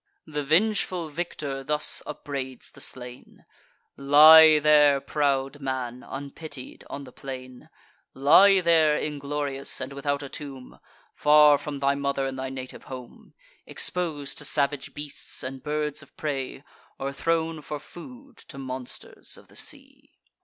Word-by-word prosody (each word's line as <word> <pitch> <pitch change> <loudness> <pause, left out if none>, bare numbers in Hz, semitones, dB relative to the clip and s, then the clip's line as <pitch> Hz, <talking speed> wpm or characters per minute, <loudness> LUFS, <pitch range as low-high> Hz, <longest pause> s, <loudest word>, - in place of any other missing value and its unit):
The 150 -1 -4
vengeful 180 +1 +1
victor 145 -4 -5
thus 150 +2 +2
upbraids 135 -4 -6
the - - -11
slain: 125 -1 -6 0.5
"Lie 155 +3 +8
there, 150 -2 +5
proud 140 -1 -1
man, 130 -2 -4
unpitied, 140 0 -8
on 140 - -6
the 130 - -12
plain; 130 -2 -9 0.5
Lie 190 +8 +6
there, 160 -3 +4
inglorious, 145 -2 -3
and 130 +1 -5
without 140 +1 -2
a - - -6
tomb, 135 -2 -9 0.3
Far 150 -1 +6
from 145 -2 -6
thy 140 0 +3
mother 140 -1 -1
and 135 0 -4
thy 130 0 -3
native 130 -1 -8
home, 125 -2 -11 0.3
Exposed 155 -6 -2
to - - -5
savage 140 -1 -1
beasts, 145 -1 -6
and 130 0 -5
birds 150 -1 -2
of - - -19
prey, 135 -3 -4 0.3
Or 135 +1 -4
thrown 165 +1 -1
for 150 0 -6
food 250 - -13
to 140 - -11
monsters 130 -2 -8
of - - -18
the - - -19
sea." - - -6
145 Hz, 140 wpm, -26 LUFS, 135-150 Hz, 0.5 s, Lie